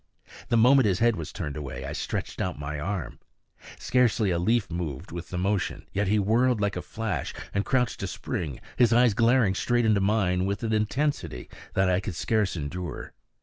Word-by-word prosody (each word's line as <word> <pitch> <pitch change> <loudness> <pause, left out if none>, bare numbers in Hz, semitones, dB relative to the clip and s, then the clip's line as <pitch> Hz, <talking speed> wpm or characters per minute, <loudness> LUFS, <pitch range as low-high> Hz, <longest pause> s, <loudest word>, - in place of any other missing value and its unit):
The 120 - +3
moment 125 +1 +6
his 95 -3 +2
head 120 +1 +3
was 80 -3 -6
turned 75 -7 -5
away, 75 -4 -6
I - - -4
stretched - - -4
out 90 - -2
my 75 +1 -4
arm. 95 +3 -4 0.6
Scarcely 120 -5 +2
a 85 - +1
leaf 110 +2 +1
moved 85 -1 -4
with 85 0 -7
the 90 - -4
motion, 95 0 -1
yet 100 +1 0
he 105 +3 +3
whirled 115 +4 +2
like 100 -1 0
a 90 - -3
flash 110 - -4 0.2
and 100 - +1
crouched 125 -1 0
to - - -3
spring, 75 -7 -4 0.2
his 120 -2 +5
eyes 120 -1 +5
glaring 115 -2 +3
straight 120 +4 +1
into 105 -2 +3
mine 95 -3 +1
with 100 +3 -2
an 110 -1 0
intensity 110 - -1 0.2
that 95 0 +3
I 90 0 +3
could 100 -3 -5
scarce 105 +2 0
endure. 85 +1 -5
100 Hz, 190 wpm, -27 LUFS, 90-115 Hz, 0.6 s, moment